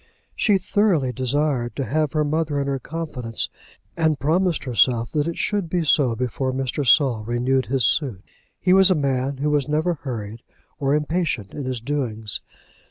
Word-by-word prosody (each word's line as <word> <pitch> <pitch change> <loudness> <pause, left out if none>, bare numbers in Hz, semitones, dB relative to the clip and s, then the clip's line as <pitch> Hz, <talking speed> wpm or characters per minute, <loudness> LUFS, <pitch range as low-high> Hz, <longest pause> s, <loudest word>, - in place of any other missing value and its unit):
She 205 -3 +3
thoroughly 185 -8 +1
desired 130 -2 0
to 135 - -2
have 150 +4 0
her 155 -1 +2
mother 150 -1 0
in 140 - -1
her 140 -1 -1
confidence, 130 -8 -4 0.5
and 160 -3 +1
promised 170 +3 +1
herself 120 -2 +2
that 150 0 0
it 170 - -3
should 205 -5 -1
be 175 -1 0
so 140 -6 +3
before 125 +2 -2
Mr. 135 +2 -2
Saul 125 -4 +4
renewed 125 +3 0
his 130 -2 +1
suit. 120 - 0 0.4
He 180 - +3
was 190 0 +7
a 185 - +4
man 135 -2 -1
who 150 +2 0
was 145 -2 +1
never 160 +4 +1
hurried 115 -7 -6 0.4
or 140 0 +2
impatient 150 - -1
in 145 - -5
his 130 -2 -2
doings. 115 -6 -2
140 Hz, 170 wpm, -22 LUFS, 125-155 Hz, 0.5 s, was